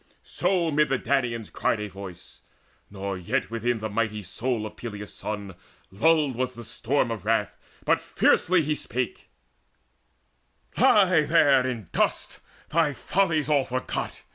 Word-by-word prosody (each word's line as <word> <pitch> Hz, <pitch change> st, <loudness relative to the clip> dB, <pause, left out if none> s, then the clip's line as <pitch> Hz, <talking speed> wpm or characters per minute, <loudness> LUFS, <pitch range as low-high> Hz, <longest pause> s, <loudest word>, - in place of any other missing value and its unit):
So 175 Hz, -4 st, 0 dB
mid 150 Hz, +1 st, +3 dB
the 135 Hz, -, +2 dB
Danaans 120 Hz, -4 st, -1 dB
cried 110 Hz, -, 0 dB
a 105 Hz, -, -3 dB
voice: 95 Hz, -3 st, -11 dB, 0.5 s
nor 100 Hz, -1 st, -5 dB
yet 90 Hz, -, -2 dB
Within 115 Hz, +1 st, 0 dB
the 110 Hz, 0 st, -3 dB
mighty 110 Hz, 0 st, -2 dB
soul 115 Hz, +4 st, -2 dB
of 110 Hz, -, -8 dB
Peleus' 105 Hz, -3 st, -7 dB
son 100 Hz, -2 st, -5 dB, 0.4 s
Lulled 145 Hz, +5 st, +3 dB
was 125 Hz, +1 st, -2 dB
the 120 Hz, -, -8 dB
storm 120 Hz, +1 st, -1 dB
of 115 Hz, -, -5 dB
wrath, 105 Hz, -2 st, 0 dB, 0.3 s
but -, -, +3 dB
fiercely 180 Hz, -1 st, +3 dB
he 150 Hz, +1 st, 0 dB
spake: 130 Hz, -4 st, -4 dB, 1.5 s
"Lie 185 Hz, -6 st, +5 dB
there 140 Hz, -5 st, +4 dB
in 115 Hz, -7 st, -5 dB
dust, -, -, -1 dB, 0.3 s
thy 160 Hz, -2 st, +2 dB
follies 160 Hz, -2 st, +1 dB
all 145 Hz, -3 st, +3 dB
forgot! 130 Hz, 0 st, -4 dB
120 Hz, 140 wpm, -26 LUFS, 105-150 Hz, 1.5 s, Lie